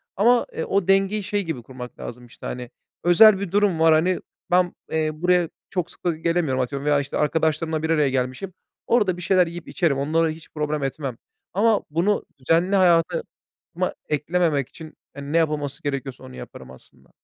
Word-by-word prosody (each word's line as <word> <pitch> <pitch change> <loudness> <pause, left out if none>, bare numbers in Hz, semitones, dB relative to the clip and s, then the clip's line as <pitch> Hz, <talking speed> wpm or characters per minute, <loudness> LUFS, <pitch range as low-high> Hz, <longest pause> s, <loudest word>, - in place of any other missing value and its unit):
Ama, 235 +4 +4
eee, 160 - -3
o 195 -2 0
dengeyi 195 +2 +2
şey 205 +1 -1
gibi 160 -8 -5
kurmak 125 0 -10
lazım, 125 +1 -8
işte, 120 - -13
hani, 125 -1 -5 0.3
özel 195 +4 +7
bir 200 -3 -4
durum 200 -4 +2
var, 160 0 +6
hani, 175 +4 +2 0.3
ben, 180 0 +3 0.2
eee, 155 -1 +1
buraya 175 +1 +2 0.2
çok 180 -3 -3
sık - - -16
da 170 -2 +1
gelemiyorum, 165 -5 0
atıyorum 140 +3 -3
veya 145 -1 +3
işte 140 - -3
arkadaşlarımla 160 0 0
bir 160 - -1
araya 150 -4 +3
gelmişim. 130 +8 -2 0.3
Orada 205 -7 +2
bir 180 - -7
şeyler 180 0 +3
yiyip 170 0 -8
içerim, 160 -6 0
onları 160 +4 +1
hiç 155 0 -8
problem 150 -1 -1
etmem. 135 -2 -3 0.4
Ama 215 +2 +3
bunu 175 +7 +1
düzenli 165 +8 +2
hayatıma 180 - +3 0.9
eklememek 150 -2 0
için, 160 -1 -12 0.2
hani, 140 +1 -7
ne 165 - +3
yapılması 150 -3 -1
gerekiyorsa, 135 -2 -4
onu 65 - -11
yaparım 65 +1 -10
aslında. 65 - -16
160 Hz, 180 wpm, -23 LUFS, 140-180 Hz, 0.9 s, özel